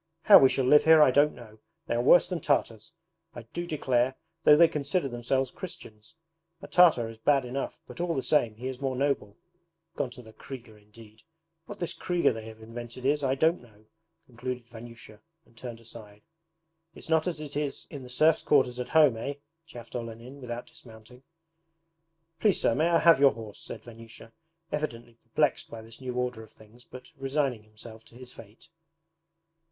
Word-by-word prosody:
'How 205 - +9
we 135 - +6
shall 130 - 0
live 150 +4 +5
here 160 0 +7
I 150 -4 +6
don't 145 +3 +3
know. 110 -3 -14 0.3
They - - -2
are 120 - +1
worse 155 +9 +6
than 180 -2 -3
Tartars, 115 -7 -1 0.4
I 120 - -8
do 175 0 -4
declare 130 -5 0 0.3
though 150 - +8
they 170 +1 +7
consider 145 +1 -1
themselves 130 +1 -1
Christians! 110 - -10 0.4
A 195 - -10
Tartar 165 -10 +4
is 115 0 -11
bad 135 +2 +2
enough, 130 +3 -4
but - - -8
all 175 -1 -1
the 135 - -2
same 120 -5 +2
he 125 +4 -6
is 130 0 -6
more 135 -1 -2
noble. 135 -7 -1 0.6
Gone 130 - -2
to 125 0 -12
the 110 -1 -15
KRIGA 120 -5 -11
indeed! 110 +1 -17 0.5
What 205 - -8
this 175 - -2
KRIGA 175 -7 0
they 110 -1 -8
have 110 0 -12
invented 120 +2 -9
is, 145 +2 +2
I 135 0 +1
don't 160 +5 +2
know!' 110 -3 -21 0.4
concluded 125 -1 -6
Vanyusha, 115 -2 -12 0.3
and 115 - -27
turned 120 -1 -8
aside. 105 -3 -13 0.7
'It's - - -10
not 160 +1 +2
as 170 -4 -3
it 150 -2 -8
is 145 -1 -3
in 145 - -7
the 125 - -11
serfs' 155 +5 +3
quarters 130 -4 +2
at 125 - -4
home, 150 -7 +6
eh?' 140 +5 -4 0.3
chaffed 120 -7 -12
Olenin 120 +3 -8
without 120 -1 -6
dismounting. 115 +2 -15 1.2
'Please 200 +2 +3
sir, - - +2
may 160 +7 +1
I 170 - +4
have 165 -3 +5
your 140 -1 +6
horse?' 110 -2 -10
said - - -9
Vanyusha, 115 -1 -13 0.4
evidently 120 -6 -5
perplexed 135 +4 0
by 110 -1 -9
this 115 +3 -13
new 125 -1 -5
order 125 -2 -2
of 110 -1 -14
things 115 +3 -19
but 130 +6 -13
resigning 135 -3 -1
himself 110 +1 -13
to - - -19
his 125 0 -12
fate. 115 +7 -15
125 Hz, 190 wpm, -28 LUFS, 115-145 Hz, 1.2 s, How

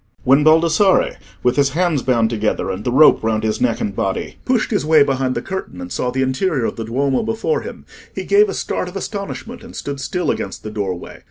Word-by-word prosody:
When 140 +3 +4
Baldassarre, 165 +5 +4 0.3
with 125 +2 +2
his 140 -1 +4
hands 175 -6 +2
bound 120 -3 +1
together, 105 -3 -1
and 95 +2 -5
the 125 - -1
rope 150 0 +6
round 110 -1 0
his 110 -1 -1
neck 120 -2 +1
and 100 -1 -3
body, 95 0 -3
pushed 250 -3 +1
his 205 - +1
way 155 -1 +5
behind 130 -2 -1
the - - -3
curtain, 190 - -6
and 90 0 -7
saw 125 - -1
the 130 +1 0
interior 130 0 0
of - - -2
the 115 - -5
Duomo 130 +3 0
before 225 - -1
him, - - -9 0.3
he - - -3
gave 410 +1 +4
a - - -3
start - - -2
of 180 - -13
astonishment, 205 +4 -6
and 235 - -12
stood 140 -1 -5
still 180 +6 -1
against - - -5
the 110 - -6
doorway. 95 -4 -5
135 Hz, 225 wpm, -19 LUFS, 115-185 Hz, 0.3 s, rope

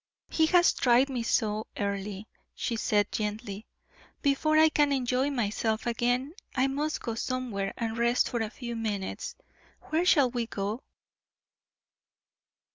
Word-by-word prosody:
"He 320 -1 +3
has 350 +1 +5
tried 250 +2 +4
me 255 -3 -2
so, 220 -2 0
Earle," 200 0 -3 0.3
she 235 - -2
said, 210 -2 +1
gently. 210 0 -4 0.6
"Before 300 +2 +3
I 315 0 +7
can 295 -2 +2
enjoy 260 0 +1
myself 220 -3 -1
again, 245 +4 0 0.2
I 260 0 +3
must 290 +3 -1
go 230 - -2
somewhere 225 -5 -3
and 225 -1 -2
rest 235 +1 +2
for 240 - -2
a 220 - -1
few 235 0 -6
minutes. 210 -4 -3 0.6
Where 320 +2 +2
shall 285 -8 +4
we 235 -2 -2
go?" 210 +3 -3
240 Hz, 135 wpm, -29 LUFS, 215-270 Hz, 0.6 s, I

